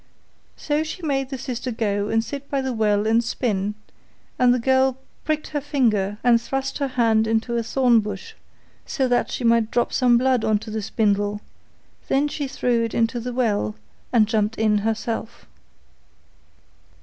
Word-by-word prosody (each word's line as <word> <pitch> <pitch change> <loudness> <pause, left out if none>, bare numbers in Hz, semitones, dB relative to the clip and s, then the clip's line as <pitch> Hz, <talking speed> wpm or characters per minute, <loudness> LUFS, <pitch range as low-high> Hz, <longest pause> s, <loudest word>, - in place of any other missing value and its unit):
So 295 0 -1
she 315 +3 -6
made 270 -3 -1
the 270 - -4
sister 250 0 -4
go 210 -3 -1
and 225 0 +1
sit 280 +3 -7
by 275 -1 0
the 265 -1 -2
well 210 -2 +1
and 225 +2 +3
spin, 210 -4 -2 0.6
and 250 -1 +5
the 250 - +3
girl 260 +1 +2 0.3
pricked 310 0 -1
her 295 -1 -2
finger 220 -9 0
and 235 -2 +4
thrust 270 +4 -3
her 280 - 0
hand 225 -4 +2
into 225 +2 0
a 235 - +1
thorn 240 0 +3
bush, 210 -2 -6 0.5
so 265 -4 -1
that 245 -1 +1
she - - -4
might 230 -1 +3
drop 240 +1 0
some 245 -2 +4
blood 255 -1 +2
on 215 -1 +2
to 215 +1 -8
the 220 0 -2
spindle; 205 -1 0 0.7
then 280 +2 +2
she 290 -1 -4
threw 245 -3 0
it 230 - -3
into 230 +1 +1
the 250 +2 -4
well, 210 - 0 0.4
and 230 -3 +5
jumped 215 0 0
in 215 -1 +2
herself. 225 +1 -3
235 Hz, 175 wpm, -23 LUFS, 220-260 Hz, 0.7 s, and